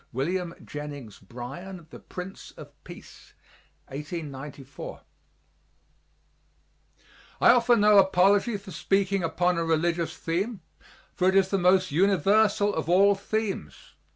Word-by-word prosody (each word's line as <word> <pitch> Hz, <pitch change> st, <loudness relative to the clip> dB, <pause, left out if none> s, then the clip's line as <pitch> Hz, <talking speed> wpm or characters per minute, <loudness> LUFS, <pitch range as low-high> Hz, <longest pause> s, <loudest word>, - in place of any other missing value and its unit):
WILLIAM 170 Hz, +7 st, -2 dB
JENNINGS 145 Hz, -7 st, -8 dB
BRYAN 140 Hz, -, -9 dB
THE -, -, -10 dB
PRINCE 180 Hz, +1 st, -9 dB
OF -, -, -14 dB
PEACE -, -, -14 dB, 0.5 s
(1894) 145 Hz, -2 st, -8 dB, 2.4 s
I -, -, +7 dB
offer 240 Hz, 0 st, +4 dB
no 210 Hz, -2 st, +6 dB
apology 195 Hz, +4 st, +3 dB
for 195 Hz, -1 st, -12 dB
speaking 195 Hz, 0 st, 0 dB
upon 175 Hz, +1 st, 0 dB
a -, -, 0 dB
religious 165 Hz, 0 st, -1 dB
theme, 190 Hz, +5 st, -3 dB, 0.5 s
for 185 Hz, 0 st, +2 dB
it 190 Hz, -, 0 dB
is 195 Hz, -1 st, +4 dB
the 195 Hz, -, 0 dB
most 185 Hz, -1 st, +3 dB
universal 200 Hz, +4 st, +3 dB
of 160 Hz, -1 st, -3 dB
all 195 Hz, +3 st, +5 dB
themes. 210 Hz, +1 st, -4 dB
180 Hz, 115 wpm, -26 LUFS, 160-200 Hz, 2.4 s, I